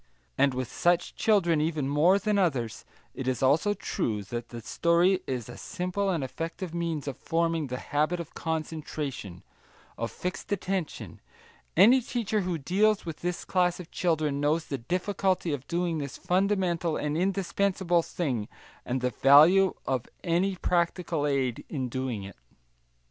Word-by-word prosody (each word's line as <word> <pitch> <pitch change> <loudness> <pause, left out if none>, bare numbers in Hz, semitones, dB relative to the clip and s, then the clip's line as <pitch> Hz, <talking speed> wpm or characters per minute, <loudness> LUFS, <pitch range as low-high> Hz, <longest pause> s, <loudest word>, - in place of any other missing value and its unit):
And 135 - +3
with 130 -1 -2
such 175 0 +1
children 175 -8 +3
even 155 -3 -1
more 155 +7 +4
than 210 +1 0
with 195 - +5
others 120 -9 -3 0.3
it 130 - -5
is 130 0 0
also 160 +10 +3
true 110 - -2
that 120 +4 -6
the 120 - -7
story 170 - +2
is 125 -4 -3
a 120 - -9
simple 195 +1 -2
and 170 -7 0
effective 165 +5 -5
means 165 -4 -2
of 135 - -4
forming 165 -2 0
the 125 0 -4
habit 155 +6 0
of 165 -2 -7
concentration, 155 - -4 0.6
of 115 0 -1
fixed 180 +3 -5
attention; 190 -4 -3 0.6
any 235 +8 +7
teacher 225 -3 -1
who 180 -2 -2
deals 200 +8 +2
with 165 -3 -5
this 175 +1 -3
class 180 -1 +1
of 180 -2 -10
children 155 -5 0
knows 155 +3 +1
the 140 - -4
difficulty 180 - 0
of 140 -1 -5
doing 170 -2 -1
this 140 -3 -5
fundamental 180 -3 +1
and 150 0 -2
indispensable 190 -1 +1
thing, 130 -11 -2 0.4
and 130 +1 -2
the 125 0 0
value 155 - +6
of 130 -3 -1 0.2
any 185 +3 +1
practical 170 -3 0
aid 130 -4 0
in 130 -5 -3
doing 125 -4 -3
it. 100 -9 -10
165 Hz, 155 wpm, -28 LUFS, 135-180 Hz, 0.6 s, any